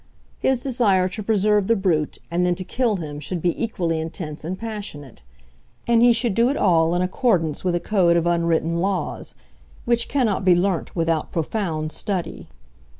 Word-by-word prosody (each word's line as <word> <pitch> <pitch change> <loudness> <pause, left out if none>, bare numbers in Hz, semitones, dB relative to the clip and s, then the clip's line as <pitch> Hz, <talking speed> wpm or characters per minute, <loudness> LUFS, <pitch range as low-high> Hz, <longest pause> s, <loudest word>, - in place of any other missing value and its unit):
His 260 -2 +1
desire 210 -8 +2
to 200 +4 -6
preserve 210 -1 +2
the 230 - +3
brute 170 -7 0
and 175 +1 +1
then 180 0 +2
to 185 - -5
kill 235 +2 0
him 150 -5 -6
should 155 +5 -3
be 175 +6 -1
equally 170 -8 -1
intense 160 -1 -6
and 180 +4 -4
passionate. 200 - -7 0.6
And 235 -1 +3
he 240 0 +7
should 230 -2 +1
do 230 +4 +3
it 280 - -1
all 165 -2 +3
in 180 - +1
accordance 185 - 0
with 180 -2 +1
a - - +1
code 175 -2 +2
of 170 - 0
unwritten 170 -1 +1
laws, 185 -1 -2 0.5
which 235 0 +1
cannot 230 -9 +1
be 185 -2 +5
learnt 180 -1 -1
without 165 -2 0
profound 160 -3 -2
study. 185 -4 -3
185 Hz, 175 wpm, -22 LUFS, 165-215 Hz, 0.6 s, he